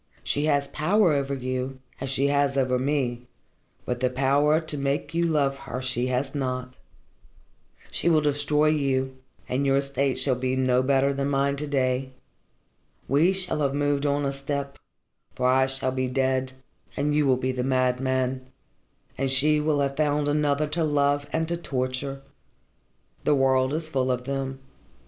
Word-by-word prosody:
She 145 +1 0
has 140 -2 +2
power 175 +4 +2
over 140 -1 -1
you, 130 0 -4 0.2
as 135 - -4
she 135 +1 +1
has 140 -1 +1
over 130 -1 +1
me, 125 -3 -1 0.6
but 125 0 -2
the 130 0 +1
power 140 +4 +2
to 160 -2 -5
make 140 +3 -2
you 170 +1 +1
love 145 -4 +1
her 125 - -6
she 125 -1 0
has 130 +2 -1
not. 130 -2 -4 1.1
She - - +1
will 160 -2 +5
destroy 150 +1 +2
you, 135 -3 0 0.3
and 130 +2 -1
your 135 0 +3
state 140 -1 0
will 135 - +2
be 130 +1 -1
no 130 -1 +2
better 135 +1 +2
than 140 0 -1
mine 140 0 +1
to 150 +1 -4
day. 130 -1 0 0.9
We 150 +7 +4
shall 190 -4 -2
have 140 -1 0
moved 145 0 +1
on 145 0 0
a 135 - 0
step, 140 0 -4 0.6
for 125 - +1
I 130 +1 +4
shall 135 -1 -1
be 130 0 -1
dead 130 0 0 0.4
and 145 +1 0
you 150 -1 +2
will 130 -1 +4
be 130 +1 -1
the 130 -1 -3
madman, 130 0 0 0.7
and 135 0 +1
she 150 +3 +4
will 150 -1 +1
have 140 0 -1
found 150 -1 +1
another 145 0 +1
to 165 +2 0
love 145 -1 +1
and 160 0 0
to 170 +1 -2
torture. 135 -2 -3 1.0
The 150 - +3
world 130 -1 +2
is 155 +1 -2
full 130 -4 0
of 125 -1 -1
them. 135 0 -4
135 Hz, 170 wpm, -25 LUFS, 130-145 Hz, 1.1 s, will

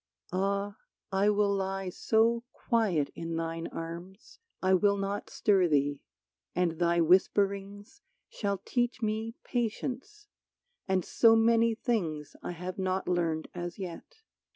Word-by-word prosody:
Ah! 200 +2 -1 0.3
I 195 +2 +3
will 205 -1 +3
lie 195 -1 -2
so 230 +5 +2
quiet 205 - +1
in 165 0 -4
thine 165 0 -3
arms 170 - -8 0.2
I 185 0 +2
will 200 +2 +4
not 200 +1 -3
stir 195 -4 +3
thee; 145 -2 +1 0.5
and 170 -3 0
thy 170 0 +3
whisperings 200 - +1 0.3
Shall 200 -2 -2
teach 245 0 -1
me 220 +2 -1
patience, 260 - -3 0.6
and 190 -2 +1
so 225 -1 +5
many 230 0 +4
things 170 - -2
I - - -4
have 180 +2 -6
not 190 0 -1
learned 170 -3 0
as 175 -1 -5
yet. 200 - -8
195 Hz, 130 wpm, -30 LUFS, 175-220 Hz, 0.6 s, so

